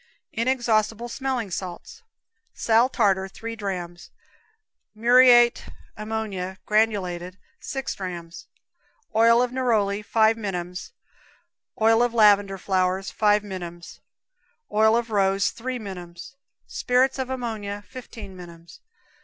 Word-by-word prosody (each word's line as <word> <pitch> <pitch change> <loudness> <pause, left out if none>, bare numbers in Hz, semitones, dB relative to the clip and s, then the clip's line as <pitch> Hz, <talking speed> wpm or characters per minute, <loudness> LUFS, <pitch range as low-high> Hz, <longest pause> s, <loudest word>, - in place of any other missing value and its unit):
Inexhaustible 230 -2 0
Smelling 255 -5 -3
Salts. 185 - -7 0.5
Sal 230 +2 +3
tartar, 195 -6 +1
three 230 +4 -7
drams; 180 -4 -6 0.9
muriate 240 +1 +5 0.3
ammonia, 210 -4 -4
granulated, 190 -4 0 0.2
6 270 -1 -4
drams; 175 -3 -7 0.7
oil 230 +2 +5
neroli. 225 -6 0
5 220 +1 +3
minims; 180 - -5 0.9
oil 225 +1 +4
lavender 210 -5 +4
flowers, 185 0 -1
5 210 -1 +2
minims; 175 -4 -8 0.7
oil 220 +2 +4
rose, 200 -3 +1
3 255 +2 -5
minims; 180 0 -9 0.3
spirits 260 +2 +1
ammonia, 225 -6 -4
15 225 -6 -10
minims. 170 -2 -13
215 Hz, 90 wpm, -24 LUFS, 190-235 Hz, 0.9 s, muriate